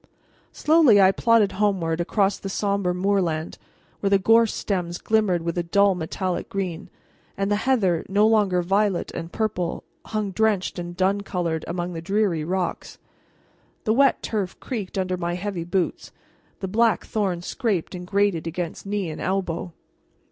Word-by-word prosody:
Slowly 300 -9 +5
I 190 -1 +7
plodded 225 -1 +3
homeward 185 -5 0
across 195 +2 +1
the 195 - -5
somber 200 -2 0
moorland, 180 -4 -1 0.4
where 200 - 0
the 200 - +5
gorse 225 +3 +4
stems 175 -4 -2
glimmered 205 -6 +1
with 170 +1 -2
a - - +2
dull 200 +4 +3
metallic 180 +1 -3
green, 185 -4 -4 0.5
and 195 +1 -1
the - - +4
heather, 190 -10 +2
no 205 +2 +4
longer 205 -5 +3
violet 195 +1 +1
and 165 +1 -6
purple, 195 -6 -2 0.2
hung 215 -2 -2
drenched 205 -3 0
and 175 0 -6
dun 195 +2 +2
colored 170 -5 -2
among 175 +1 -3
the 165 - -5
dreary 195 -3 0
rocks. 180 +2 -3 0.9
The 220 - +2
wet 275 +2 +3
turf 200 -5 -3
creaked 210 -8 -5
under 185 -1 -1
my 175 -1 -2
heavy 185 -2 -4
boots, 175 +1 -2 0.5
the 190 - -2
black 225 +3 +2
thorn 190 -5 -1
scraped 200 -4 -2
and 180 -1 -7
grated 200 -4 +1
against 170 +3 -5
knee 200 -5 -2
and 155 - -7
elbow. 185 -2 -2
190 Hz, 155 wpm, -24 LUFS, 175-205 Hz, 0.9 s, I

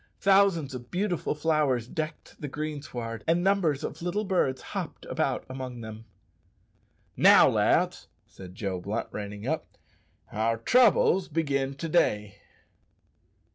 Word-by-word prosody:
Thousands 190 -8 +3
of 120 -1 -8
beautiful 180 -4 -1
flowers 150 -6 +1
decked 155 +4 -6
the 145 - -3
greensward, 135 -7 -5
and 170 +2 +2
numbers 175 -7 +1
of - - -5
little 180 +5 -1
birds 180 -10 0
hopped - - -5
about - - -1
among 130 -2 -7
them. 110 0 -9 1.1
"Now, - - +7
lads," - - +1 0.2
said 90 -1 -12
Joe 95 -3 -3
Blunt, 105 +5 -4
reining 105 0 -6
up, 160 +4 -3 0.5
"our 115 +1 0
troubles 195 - +4
begin 140 -4 -1
to 165 +4 -5
day." 105 - 0
140 Hz, 125 wpm, -27 LUFS, 115-170 Hz, 1.1 s, Now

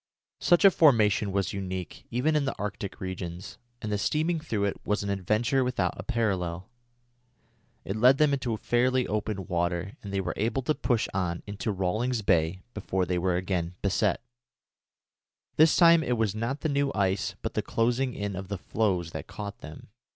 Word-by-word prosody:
Such 175 +3 +4
a 195 - +9
formation 110 - +4
was 100 0 -1
unique, 95 -2 -5
even 135 +7 +1
in 150 -2 +2
the 140 - -3
Arctic 100 -1 -5
regions, 90 -1 -6 0.2
and 105 - -3
the 105 - 0
steaming 160 +7 0
through 115 -10 -2
it 100 - -1
was 105 0 -1
an 100 - -2
adventure 110 +7 +1
without 125 0 0
a - - -6
parallel. 95 -7 -2 1.1
It 95 - -3
led 125 +5 +5
them 150 -1 +3
into 125 -5 -1
fairly 125 +4 +1
open 105 -2 -2
water, 85 +2 -2
and 100 - -7
they 100 - -1
were 95 - -2
able 115 +5 0
to 155 - +1
push 120 -6 0
on 90 -3 -2
into 100 +1 -3
Rawlings 110 +5 -1
Bay 85 0 +1
before 95 -2 -1
they 90 0 -1
were 90 0 +1
again 90 -1 -2
beset. 100 +1 +1 1.3
This 155 +1 +6
time 170 -1 +7
it 125 -6 0
was 110 -3 +1
not 115 +6 -3
the 160 - 0
new 140 -1 +1
ice 95 -1 0
but - - -3
the - - 0
closing 120 +2 0
in 100 -1 -3
of 95 +1 -6
the 100 0 -3
floes 90 -4 -1
that - - -6
caught 100 0 -7
them. 75 +6 -11
105 Hz, 180 wpm, -28 LUFS, 95-125 Hz, 1.3 s, a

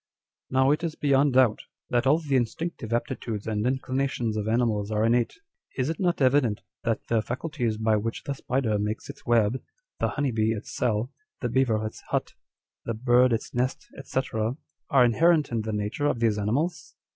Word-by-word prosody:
" - - -67
Now 130 +1 +3
it 155 +3 0
is 165 -2 -2
beyond 140 -1 +3
doubt, 125 -4 +4 0.3
that 120 +1 +2
all 145 +4 +5
the 150 -5 -1
instinctive 125 0 -2
aptitudes 115 -2 -2
and 110 +1 -1
inclinations 130 -3 -1
of 105 0 -2
animals 110 -3 +1
are 110 0 +1
innate. 120 +1 +2 0.4
Is 130 +1 0
it 165 - -6
not 175 -6 +1
evident 130 -5 +3 0.2
that 115 -2 -1
the 115 -2 +2
faculties 125 -1 -2
by 110 0 +2
which 115 +2 -3
the 140 - -2
spider 125 -5 -1
makes 105 +6 -3
its 140 - -20
web, 120 +1 +3 0.4
the - - +2
honey 145 -3 -1
bee 110 0 +1
its 110 -1 -7
cell, 115 0 0 0.3
the - - -1
beaver 115 -5 +1
its 110 - -6
hut, - - -1 0.5
the 115 - -3
bird 125 +2 +4
its 115 - -2
nest, 125 +2 -2 0.2
&c. - - 0 0.7
are 130 -3 +6
inherent 155 +5 +3
in 115 -1 0
the 110 0 -4
nature 105 +7 -1
of 125 - 0
these 110 -3 +2
animals 145 - -1
120 Hz, 185 wpm, -26 LUFS, 110-135 Hz, 0.7 s, are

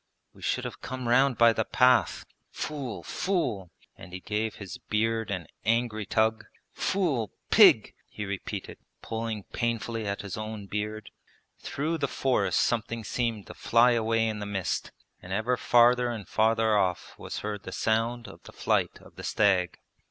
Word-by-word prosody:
We - - -18
should - - -1
have - - -7
come 130 -1 -5
round 130 +2 +4
by 115 -1 +6
the 110 - 0
path.... 125 +3 +3 0.2
Fool! 140 -7 -5
fool!' 165 - -1 0.3
and 90 +1 -12
he 95 - -5
gave 105 +3 -2
his 100 -4 -8
beard 110 0 -1
an 90 -4 -3 0.2
angry 110 -2 0
tug. 110 +1 +1 0.3
Fool! 150 - 0 0.2
Pig!' - - +7 0.2
he 105 - -6
repeated, 100 -1 -5 0.2
pulling 110 -2 -4
painfully 115 -1 -2
at 100 0 -3
his 100 - -5
own 110 -1 -5
beard. 105 +1 -4 0.5
Through 160 +4 -2
the 140 - 0
forest 115 -10 +1
something 115 0 -1
seemed 115 -1 -2
to - - -10
fly 120 +2 +4
away 115 -1 +1
in 110 -1 -3
the 105 - -5
mist, 95 -3 -2 0.3
and 90 - -10
ever 110 +6 +1
farther 120 +1 +4
and 110 -4 -5
farther 110 0 +2
off 95 -3 0
was - - -6
heard 105 -1 -4
the 95 - -8
sound 115 +3 0
of - - -12
the - - -13
flight - - 0
of - - -18
the - - -8
stag. 95 -4 +2
110 Hz, 165 wpm, -28 LUFS, 105-120 Hz, 0.5 s, Pig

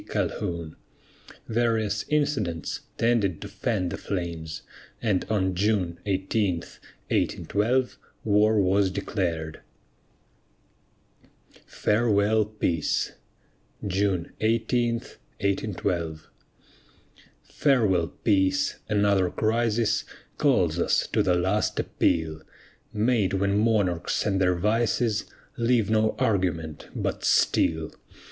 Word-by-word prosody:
Calhoun. 85 -2 -3 0.7
Various 110 -3 0
incidents 135 - -1 0.2
tended 115 -7 +1
to - - -7
fan 100 -7 -2
the - - -4
flames, 85 -4 -4 0.4
and 105 -6 +1
on 95 -4 +1
June 90 -3 0
18, 95 0 +1 0.6
1812, 125 +5 0 0.2
war 105 +1 +3
was 95 0 +3
declared. 90 -5 -3 2.1
FAREWELL, 105 -1 +2
PEACE 95 -7 -1 0.7
[June 95 -3 0
18, 115 +2 +1 0.5
1812] 90 -5 -2 1.2
Farewell, 105 - +2 0.2
Peace! 95 -3 +2
another 100 -3 +3
crisis 115 +1 +1 0.4
Calls - - +2
us - - +2
to - - 0
"the 90 -2 +2
last 95 +4 0
appeal," 80 -1 0 0.5
Made 110 -2 +1
when 100 +1 +1
monarchs 105 -6 +1
and 95 -3 +1
their 90 -1 +3
vices 110 +3 +1 0.3
Leave 115 -3 +2
no 110 0 +2
argument 85 -7 -1
but - - -2
steel. 80 -1 +2
100 Hz, 90 wpm, -26 LUFS, 90-110 Hz, 2.1 s, war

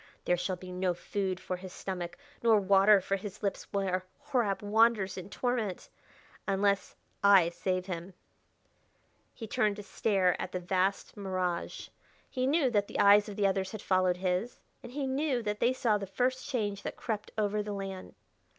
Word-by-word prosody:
There 175 - +3
shall 185 +1 -2
be 180 0 -10
no 180 -1 0
food 190 0 -2
for 185 - -4
his 185 0 -9
stomach 180 -2 -5 0.2
nor 225 -2 +5
water 195 +1 +5
for 195 +2 -1
his 200 +1 -8
lips 200 - -2
where 190 -2 0 0.2
Horab 245 -9 0
wanders 210 -2 +3
in 185 0 -7
torment.... 230 -5 -2 0.6
Unless 200 0 +1 0.3
I 195 -4 +7
save 185 +1 -2
him." 180 0 -6 1.2
He 225 - -7
turned 210 -1 +1
to 210 - -8
stare 195 -4 +1
at - - -5
the 180 - -1
vast 185 +2 0
mirage. 185 -4 -3 0.4
He 255 0 -1
knew 280 -3 +3
that 205 -3 +2
the - - -6
eyes 205 +1 +6
of 205 - -7
the 205 - +1
others 190 0 0
had 215 - -6
followed 185 -1 +2
his, 185 +5 -1 0.2
and 240 - -10
he 275 +1 -2
knew 265 -2 0
that 210 -1 -2
they 240 - +3
saw 230 -5 +1
the 195 - -5
first 255 +6 -1
change 205 -7 -1
that - - -6
crept 215 -3 -3
over 210 0 +1
the 210 0 -4
land. 195 -1 -6
200 Hz, 180 wpm, -30 LUFS, 185-215 Hz, 1.2 s, I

